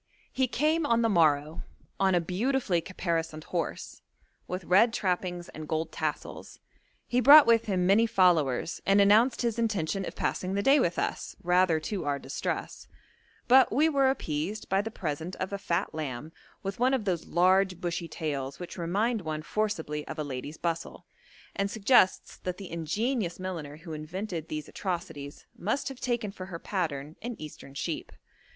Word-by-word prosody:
He 260 -1 +2
came 310 +6 +1
on 235 -5 +2
the 230 - +3
morrow, 155 -4 +2 0.4
on 190 -1 +3
a - - +4
beautifully 190 +2 0
caparisoned 165 -3 -3
horse, 170 -2 -4 0.5
with 180 +1 -4
red 205 +7 +4
trappings 180 -4 -1
and 155 0 -8
gold 160 +1 -2
tassels. 155 -2 -4 0.5
He 245 - +1
brought 290 +3 +10
with 230 -1 +4
him 185 -4 0
many 210 +5 +5
followers 170 - +2
and 195 +1 +4
announced 220 +6 +5
his 235 -1 0
intention 195 -4 0
of - - -7
passing 185 +1 -2
the 200 - 0
day 275 +5 +6
with 175 -8 +1
us, - - -3
rather 180 -2 +3
to 195 +1 -3
our 145 -1 0
distress; - - -4 0.6
but 260 +1 +6
we 300 +7 +3
were 275 -3 +3
appeased 180 - -3
by 195 +1 +3
the 220 - -5
present 160 -3 -4
of 190 +2 -4
a 200 - -2
fat 175 0 -1
lamb 150 -1 -5 0.3
with 195 +1 -4
one 260 +2 +3
of 230 -6 -3
those 180 -4 -1
large 185 +1 +3
bushy 170 -1 -3
tails 140 -4 -4
which 175 0 -8
remind 205 +7 0
one 155 -2 -4
forcibly 160 -7 -2
of 160 - -6
a 155 - -2
lady's 145 +2 -6
bustle, 170 -1 -4 0.5
and 200 0 0
suggests 220 -2 +3
that 180 0 -5
the 195 -3 -9
ingenious 180 - -1
milliner 165 -6 -5
who 165 0 -9
invented 165 +2 -5
these 155 -1 -5
atrocities 165 -6 -5
must 220 +11 -2
have 270 -2 -9
taken 235 -4 -1
for 185 -1 -8
her 175 -3 -6
pattern 155 -6 -3
an 240 +1 -4
Eastern 145 -2 -10
sheep. - - -4
185 Hz, 170 wpm, -28 LUFS, 160-215 Hz, 0.6 s, brought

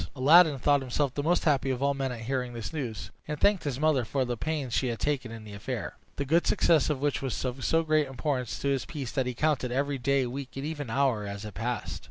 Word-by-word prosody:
Aladdin 150 +3 +6
thought 145 +2 +3
himself 130 +1 -1
the 145 - -2
most 170 +4 +2
happy 140 -3 +2
of 130 0 -1
all 140 0 +3
men 135 -1 -2
at 120 -2 -6
hearing 125 +1 -2
this 115 +5 -6
news, 125 -9 -4 0.2
and 150 -1 -4
thanked 200 -5 +3
his 135 -3 -2
mother 155 -4 +3
for 130 +3 -1
the 120 0 -2
pains 140 -1 -3
she 130 - +1
had 120 -2 -2
taken 135 -4 -1
in 115 -1 -8
the 105 -1 -10
affair, 100 - -5 0.2
the 140 - -2
good 165 +5 +2
success 160 -3 +3
of 150 -3 0
which 145 0 0
was 135 -1 -3
of 130 +1 -3
so 165 0 +2
great 155 -2 +2
importance 135 -2 -2
to 140 - -1
his 135 -2 +1
peace 140 -7 -6
that 130 -3 0
he 125 - -3
counted 140 -3 +1
every 140 +2 0
day, 135 +1 +2
week, 130 +2 -5
and 135 - -3
even 145 -5 -4
hour 125 -5 +1
as 100 +1 -6
it 105 - -7
passed. 120 +6 -3
135 Hz, 255 wpm, -28 LUFS, 125-145 Hz, 0.2 s, Aladdin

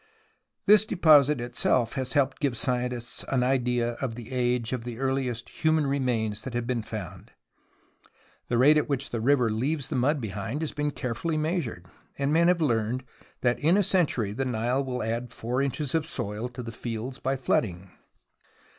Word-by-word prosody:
This 210 0 +7
deposit 150 - +5
itself 120 0 +1
has 130 -2 -2
helped 140 -2 +2
to - - -28
give 135 -5 0
scientists 125 0 -1
an 130 -2 +1
idea 125 -2 +1
of 125 -5 -2
the 120 +1 -9
age 125 -2 0
of 125 -3 -3
the 120 -1 -6
earliest 130 -2 -2
human 155 -1 +3
remains 120 -6 0
that 125 +1 -6
have 120 -1 -1
been 120 -1 -1
found. 105 -5 -8 1.1
The 120 - 0
rate 145 +5 +6
at 150 - -3
which 140 -1 -1
the 115 - -2
river 125 -2 +3
leaves 135 +6 -1
the - - -2
mud 140 +4 +2
behind 110 +6 -4
has 155 - -2
been 150 0 -1
carefully 140 +4 -3
measured, 155 - -2 0.3
and 140 +1 0
men 170 +1 +4
have 180 -1 +3
learned 120 -2 0 0.4
that 120 -1 +1
in 165 +6 +4
a 205 - +4
century 145 - +1
the 135 - -2
Nile 125 +2 0
will 125 -3 -3
add 115 +2 -3
4 125 +3 -1
inches 140 0 -2
of 160 -1 0
soil 110 -1 -3
to 125 0 -8
the 115 - -6
fields 115 +3 -5
by 135 +1 0
flooding. 95 -7 -1
125 Hz, 180 wpm, -27 LUFS, 115-140 Hz, 1.1 s, This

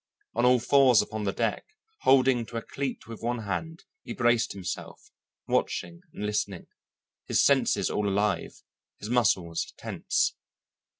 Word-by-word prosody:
On 120 +2 +1
all 125 0 +5
fours 130 -1 +5
upon 110 -1 -5
the 100 - +1
deck, 115 +1 -1 0.4
holding 130 -2 +4
to 115 - -6
a 115 - -4
cleat 135 -2 -4
with 115 -1 -9
one 120 0 -2
hand, 160 - -4 0.2
he 120 - -7
braced 120 -1 +2
himself, 90 -2 -7 0.4
watching 170 0 -1
and 105 - -5
listening, 105 -3 -2 0.6
his - - +3
senses - - +2
all 105 -1 0
alive, 100 +1 -1 0.3
his 105 - -7
muscles 95 -9 +1
tense. - - -1
115 Hz, 140 wpm, -27 LUFS, 105-125 Hz, 0.6 s, all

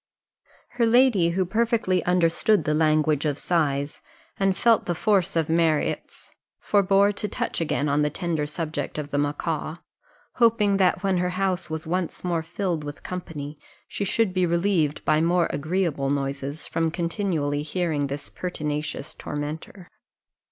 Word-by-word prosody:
Her 235 - +1
lady, 230 -7 +4
who 185 +2 0
perfectly 220 -2 +1
understood 180 +4 +3
the 150 - 0
language 155 -1 +2
of 145 -3 0
sighs, 145 -5 -1 0.4
and 195 -1 +2
felt 230 -2 +3
the 175 - 0
force 195 -1 +1
of 165 -2 +1
Marriott's, 160 -2 0 0.3
forbore 200 0 +3
to 210 - -3
touch 185 - -3
again 150 -2 0
on 145 +1 +2
the 150 - +2
tender 160 -2 -2
subject 155 0 -4
of 145 -1 -5
the 145 - +1
macaw, 155 +2 -2 0.6
hoping 225 -4 +4
that 190 +1 +2
when 190 -2 +2
her 180 0 +1
house 190 -2 0
was 160 0 -4
once 175 +2 -2
more 175 -2 0
filled 170 -1 -3
with 145 0 -8
company, 155 -5 -6 0.3
she - - -4
should 200 0 +1
be 185 -1 +2
relieved 170 -3 +1
by 155 - +3
more 170 +1 +3
agreeable 155 -3 -1
noises 140 +1 -3
from 165 -1 0
continually 170 -4 -1
hearing 155 -2 -1
this 140 +1 -5
pertinacious 150 -4 -4
tormentor. 155 +5 -6
170 Hz, 150 wpm, -25 LUFS, 150-190 Hz, 0.6 s, lady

